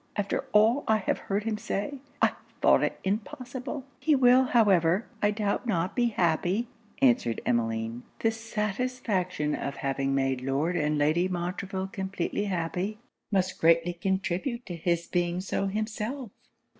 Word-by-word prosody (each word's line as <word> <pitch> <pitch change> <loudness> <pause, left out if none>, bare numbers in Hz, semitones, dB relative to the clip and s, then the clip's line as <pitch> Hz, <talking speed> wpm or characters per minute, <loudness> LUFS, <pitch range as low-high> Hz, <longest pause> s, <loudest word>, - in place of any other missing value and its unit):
After 205 -2 -1
all 225 +6 +4
I 220 - +4
have 210 - -1
heard 200 +1 -2
him 220 -1 -2
say, 215 +5 -3 0.2
I - - +6 0.3
thought - - +5
it - - -1
impossible!' 250 +6 -4
'He 295 +3 +3
will 255 0 +6
however, 195 -5 +3 0.2
I 205 - +4
doubt 210 +3 -1
not, 180 -4 0
be 245 -1 +3
happy,' 185 +2 +1 0.4
answered 235 - +3
Emmeline. 115 0 0 0.2
'The 225 - +2
satisfaction 210 -7 -2
of 140 - -3
having 135 0 -1
made 135 -1 0
Lord 140 +7 0
and 150 -2 +1
Lady 155 +5 +2
Montreville 190 +2 -3
completely 195 0 -2
happy, 185 +2 -2 0.3
must 185 -2 0
greatly 165 +1 +4
contribute 190 +7 -2
to 175 - -5
his 170 0 0
being 175 0 0
so 195 +1 -1
himself.' 215 +4 -3
195 Hz, 145 wpm, -28 LUFS, 170-225 Hz, 0.4 s, I